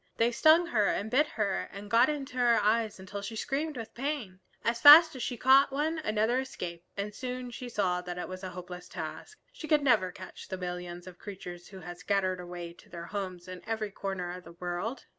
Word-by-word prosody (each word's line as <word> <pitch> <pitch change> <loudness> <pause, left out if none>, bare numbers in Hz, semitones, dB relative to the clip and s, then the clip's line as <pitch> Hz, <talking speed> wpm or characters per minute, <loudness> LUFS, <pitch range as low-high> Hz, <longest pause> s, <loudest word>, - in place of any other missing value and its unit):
They 230 +1 +3
stung 315 +8 +5
her 215 -10 +2
and 220 +2 -1
bit 295 +4 +4
her 205 -7 -2
and 200 +1 -8
got 230 +5 +5
into 285 -3 -4
her 240 -2 +4
eyes 215 0 +1
until 200 +2 -7
she 225 +3 -6
screamed 295 +5 -2
with 225 -2 -7
pain. 245 -8 -4 0.2
As 235 0 0
fast 315 +1 +10
as 255 - -6
she 245 0 -3
caught 270 +3 +6
one 310 +4 -1
another 220 -2 +1
escaped, 175 -10 -6
and 205 +1 -3
she - - -13
soon 250 -1 -4 0.2
saw 185 -5 0
that 180 0 -6
it 180 - -4
was 185 +1 -8
a 185 - -4
hopeless 180 0 -9
task. 430 - -7
She 335 -11 -8
could 300 -2 +3
never 220 -9 +3
catch 185 +1 -10
the 190 - -4
millions 180 -1 -6
of 180 -1 -12
creatures 180 -3 -8
who 190 -1 -11
had 175 0 -8
scattered 190 -1 0
away 175 -1 -7
to - - -19
their 170 -1 -7
homes 185 -2 -5
in 185 -1 -8
every 220 -2 -2
corner 190 -3 -4
of 180 0 -8
the 170 - -12
world. 180 +8 -4
205 Hz, 215 wpm, -30 LUFS, 180-255 Hz, 0.2 s, fast